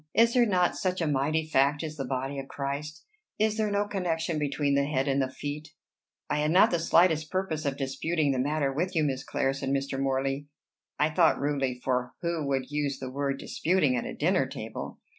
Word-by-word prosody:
Is 230 +2 +5
there 245 -2 +4
not 180 -3 +2
such 185 -1 -1
a 165 - 0
mighty 150 +2 +1
fact 145 0 +2
as 155 -1 -5
the 135 -3 -4
body 135 +2 -2
of 135 - -7
Christ? 145 +3 -5 0.3
Is 215 0 +2
there 215 -1 +1
no 205 0 +1
connection 170 -5 -1
between 145 -1 0
the 140 0 +3
head 140 -1 0
and 135 0 +2
the 130 - 0
feet?" 145 +3 -6 0.5
"I 150 - 0
had 150 0 +1
not 185 +7 +5
the 170 - +1
slightest 165 -2 +3
purpose 175 -5 -2
of 140 -1 -1
disputing 145 +3 0
the 130 - -1
matter 140 0 0
with 180 +6 -2
you, 160 - +3
Miss 135 -2 -1
Clare," 135 0 0
said 135 0 -4
Mr. 135 0 -1
Morley 135 +1 -1 0.5
I 150 +1 +2
thought 165 0 +4
rudely, 135 -3 -1
for 125 -1 -1
who 170 -4 -1
would 135 -1 -1
use 145 -2 -1
the 130 -1 -6
word 140 0 -1
disputing 155 -6 +1
at 120 - -2
a - - -6
dinner - - +2
table? - - -7
145 Hz, 210 wpm, -28 LUFS, 135-165 Hz, 0.5 s, Is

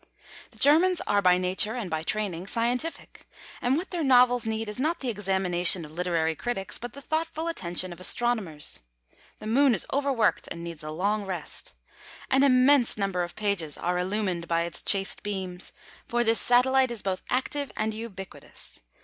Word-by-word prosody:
The - - -18
Germans 335 +5 +4
are, 205 0 +2
by 180 -2 +5
nature 185 +5 +2
and 235 -6 -4
by 160 -2 -2
training, 190 0 -3
scientific; 245 +9 -3 0.3
and 255 +3 +2
what 360 +4 -5
their 345 -3 -2
novels 245 -3 +4
need 220 0 -2
is 210 +3 -5
not 315 +6 0
the 260 - -3
examination 190 -4 +2
of 150 - -13
literary 165 -1 0
critics, 210 -1 -3
but 240 -1 -7
the 280 - -10
thoughtful 320 +1 -2
attention 180 - -2
of 175 - -14
astronomers. 190 -7 +1 0.6
The - - -11
Moon 255 +3 +4
is 190 - +1
overworked, 270 -6 +1
and 170 0 -7
needs 170 -2 -7
a 155 - -6
long 200 +7 -1
rest. 185 -2 -3 0.6
An 265 0 +4
immense 260 -2 +4
number 195 -3 -1
of 175 0 -4
pages 200 -8 -1
are 180 +1 -1
illumined 185 -2 -2
by 170 0 +1
its 170 - -2
chaste 195 -1 -1
beams, 190 -3 -5 0.4
for 240 0 +1
this 225 0 +2
satellite 260 +1 +4
is 235 -3 -6
both 190 -1 -2
active 275 +2 -1
and 215 0 -1
ubiquitous. 210 -4 -7
210 Hz, 175 wpm, -27 LUFS, 180-250 Hz, 0.6 s, by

